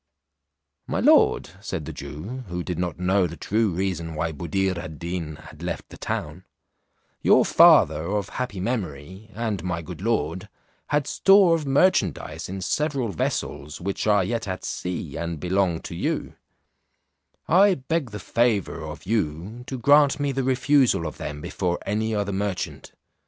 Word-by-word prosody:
"My - - -1
lord," - - +4
said 75 - -4
the 80 - -6
Jew 80 - -7
(who 90 0 -4
did 90 -2 -4
not 90 -3 -2
know 90 +1 +2
the 85 0 -9
true 110 +7 +1
reason 85 -3 -2
why 80 +1 -1
Buddir 90 +5 -1
ad 80 -2 -7
Deen 85 -2 -4
had 80 - -14
left - - -4
the - - -11
town), 75 +5 -4 0.8
"your - - +5
father 80 +2 +6
of 105 0 -1
happy 125 -7 -4
memory, 95 - -4
and 110 -6 -2
my 85 -2 -3
good 90 +1 -8
lord, 95 -6 -1 0.4
had 150 -1 +1
store 195 +1 +5
of 155 -3 -1
merchandize 135 - +1
in 95 +1 -5
several 140 - 0
vessels, 75 -4 -3
which 100 +4 -3
are 105 -2 +4
yet 115 +2 -2
at 95 -1 -4
sea, 90 -5 -4
and 85 -1 -4
belong 90 -1 +1
to - - -7
you; - - -2 1.1
I 190 +3 +5
beg 140 0 -2
the 105 -1 -7
favour 100 -6 0
of 80 -1 -8
you 100 +2 -2
to 130 - -4
grant 145 +3 +5
me 145 -1 0
the 135 0 -1
refusal 130 - +3
of 75 - -6
them 75 0 -5
before 90 +2 -2
any 110 +2 -1
other 100 -1 -1
merchant. 100 -1 -3
95 Hz, 160 wpm, -24 LUFS, 85-120 Hz, 1.1 s, father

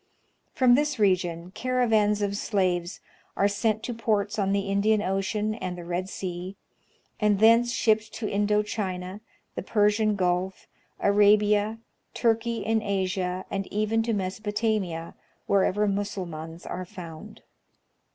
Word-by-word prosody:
From 255 -2 +4
this 295 +2 +2
region 180 -4 +1
caravans 220 -3 +1
of 200 0 -1
slaves 185 -4 -1 0.4
are 200 - +4
sent 215 +1 0
to 245 - -3
ports 215 -2 -1
on 195 -1 +1
the 200 0 +2
Indian 200 +2 +2
Ocean 195 +3 -1
and 185 -5 -5
the 175 - -8
Red 180 +2 -3
Sea, 185 0 -5 0.6
and 210 -2 +3
thence 230 +3 +5
shipped 220 -1 +1
to 220 -1 -4
Indo 210 +1 +1
China, 190 -2 -4 0.3
the - - -4
Persian 210 0 +2
Gulf, 185 0 -1 0.3
Arabia, 210 +1 +3 0.4
Turkey 230 0 0
in 220 0 +1
Asia, 185 -2 -2
and 195 -1 -2
even 215 +2 0
to 230 0 -1
Mesopotamia, 200 -3 -2 0.3
wherever 200 +1 +2
Mussulmans 180 -5 -4
are 185 - -4
found. 165 -3 -10
205 Hz, 130 wpm, -26 LUFS, 185-215 Hz, 0.6 s, thence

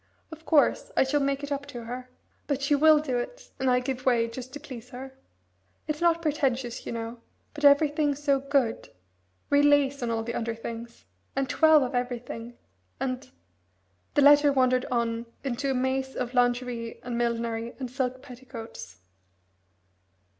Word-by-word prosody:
Of 320 0 -11
course, - - +3
I - - +6
shall 280 +2 +1
make 275 0 0
it 285 - -5
up 285 0 -3
to 245 -4 -7
her; 250 +2 -7 0.4
but 280 -2 -1
she 280 - +2
will 310 +2 +6
do 265 -5 -1
it, - - -7
and 265 - +1
I 250 0 +4
give 255 0 -4
way, 235 -3 +3
just 255 +2 -8
to 290 - -6
please 250 -5 -10
her. 260 +2 -8 0.7
It's 305 0 -3
not 335 -1 +3
pretentious, 265 -6 -1
you - - -3
know, 230 0 -5 0.3
but 300 -1 -8
everything 290 0 +4
so 280 -1 +1
good. 275 -4 0 0.6
Real 285 0 +5
lace 285 -1 +3
on 240 - -1
all 225 -1 -1
the 235 +1 -4
under 230 -1 -2
things, 230 +1 -8 0.3
and 270 0 0
twelve 310 0 +5
of 250 - -3
everything, 245 -1 -4 0.4
and 255 -1 -3 0.4
" 90 0 -43
The 290 - +5
letter 290 0 +7
wandered 255 -1 +2
on 235 -1 -1 0.2
into 275 +1 -2
a 265 - +1
maze 265 +1 -1
of 250 0 -3
lingerie 245 -1 0
and 245 -1 -4
millinery 235 -1 -2
and 255 -3 -5
silk 260 -1 -2
petticoats. 235 - -10
255 Hz, 170 wpm, -27 LUFS, 235-285 Hz, 0.7 s, letter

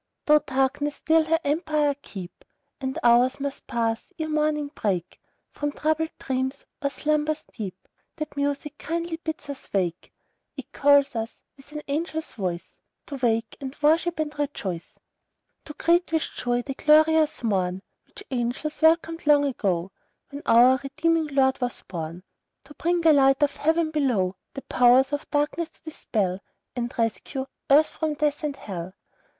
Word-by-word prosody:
Though 300 0 +6
Darkness 280 +2 0
still 320 0 +3
her 325 +1 +2
empire 300 -1 +1
keep, 185 -8 -9 0.4
And 265 -1 -3
hours 245 +3 +4
must 280 -1 -5
pass, 230 -2 -1
ere 315 -1 -3
morning 300 -1 0
break; 185 - -2 0.3
From 290 0 -3
troubled 315 +2 0
dreams, 260 0 -3 0.2
or 280 - +1
slumbers 305 +1 -1
deep, 190 -4 -7 0.3
That 305 -2 -6
music 285 +1 -2
KINDLY 335 0 -3
bids 315 -2 -6
us 280 -2 -8
wake: 180 -3 -1 0.5
It - - -8
calls 285 -1 +4
us, 225 0 -5
with 275 +1 -18
an 300 0 -6
angel's 320 +2 -3
voice, 180 -5 -5 0.2
To 280 - -6
wake, 230 -3 0
and 265 0 -6
worship, 330 +3 +3
and 305 -1 -2
rejoice; 195 - -4 0.7
To 300 - -8
greet 345 0 +2
with 320 -1 +2
joy 245 0 -1
the 270 - -4
glorious 310 0 +4
morn, 190 -3 0 0.2
Which 405 - -12
angels 255 +6 -2
welcomed 330 0 +3
long 290 -1 +6
ago, 190 -9 -1 0.4
When 285 +1 -7
our 245 +3 +7
redeeming 310 +3 0
Lord 270 -2 +2
was 245 -1 -2
born, 170 0 -6 0.4
To 285 +2 -14
bring 345 +3 0
the 325 -2 +6
light 270 0 +4
of 285 - +1
Heaven 320 +1 +1
below; 240 -12 +1 0.2
The 275 - -6
Powers 255 +3 +4
of 290 - -3
Darkness 300 +3 0
to - - -24
dispel, 205 - -2 0.4
And 240 -1 -2
rescue 235 +4 -2 0.2
Earth 295 +3 +6
from 310 -2 -2
Death 295 0 0
and 295 -2 -2
Hell. 185 -7 -7
285 Hz, 155 wpm, -25 LUFS, 240-310 Hz, 0.7 s, our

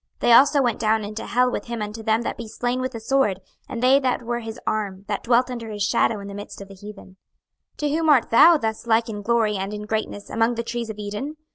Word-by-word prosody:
26:031:017 - - -45
They - - +3
also 280 +4 +6
went 240 -2 0
down 220 0 +1
into 210 +2 -6
hell 250 +1 +2
with - - -4
him 235 -1 -5
unto 210 +1 -5
them 220 +1 +1
that - - -3
be 235 - -8
slain 245 +3 -2
with 255 0 -3
the 230 - -5
sword; 220 -5 +1 0.3
and 235 0 -5
they 265 +2 +6
that 255 -2 -1
were 240 +1 -2
his 225 -1 -8
arm, 200 -2 -3
that 205 - -2
dwelt 245 +2 +2
under 235 -2 -6
his 205 -1 -3
shadow 210 +1 +1
in 200 - -8
the 200 - -8
midst 205 +1 -8
of 200 0 -10
the - - -11
heathen. 195 -1 -12 0.6
26:031:018 - - -39
To 295 - -1
whom 315 +2 0
art 275 -6 +4
thou 330 +8 +7
thus 220 -3 -4
like 230 +1 +2
in 205 -2 -5
glory 220 -1 +1
and 195 +2 -4
in 210 - -6
greatness 210 -1 -4
among 225 +2 +1
the 235 - -3
trees 235 -1 -4
of 215 - -6
Eden? 210 +9 -5
225 Hz, 265 wpm, -23 LUFS, 210-245 Hz, 0.6 s, thou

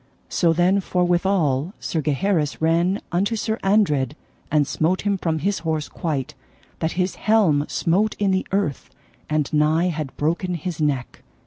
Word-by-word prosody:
So 170 -2 +2
then 180 +4 +3
forthwithal 175 -4 +1
Sir 160 - -2
Gaheris 150 +1 0
ran 170 +5 +2
unto 200 +6 +1
Sir 220 +1 -2
Andred 150 - +2 0.3
and 150 -2 +3
smote 160 +6 0
him 200 -1 +1
from 165 -4 -1
his 195 +4 -1
horse 160 -2 -2
quite, 145 -6 -3 0.5
that 160 - -1
his 180 0 0
helm 190 -10 +3
smote 200 +6 +1
in 200 -2 +1
the 190 0 0
earth, 190 -9 -1 0.4
and 155 -1 0
nigh 155 +4 +3
had 155 -5 -5
broken 170 +4 -1
his 170 -1 -4
neck. 140 -5 -1
170 Hz, 150 wpm, -22 LUFS, 150-190 Hz, 0.5 s, then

